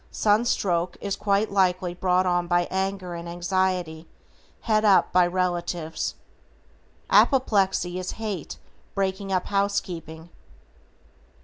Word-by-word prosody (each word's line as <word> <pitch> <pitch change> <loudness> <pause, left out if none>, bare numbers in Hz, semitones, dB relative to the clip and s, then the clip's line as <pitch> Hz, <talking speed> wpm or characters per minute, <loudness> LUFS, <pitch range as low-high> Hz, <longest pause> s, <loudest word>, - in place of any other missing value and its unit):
Sunstroke 200 -5 +1
is 200 -1 -3
quite 200 +1 0
likely 185 -2 +1
brought 180 +1 +1
on 175 -1 +1
by 175 0 +2
anger 190 -1 -2
and 170 0 -6
anxiety 175 -2 -1 0.5
"het 215 -1 +1
up" 200 -3 +4
by 180 -1 +5
relatives. 175 -2 -2 1.0
Apoplexy 195 -8 +3
is 185 - -4
hate 210 -8 -5 0.4
breaking 195 0 -2
up 185 -1 0
housekeeping. 175 -5 -3
185 Hz, 105 wpm, -25 LUFS, 175-200 Hz, 1.0 s, by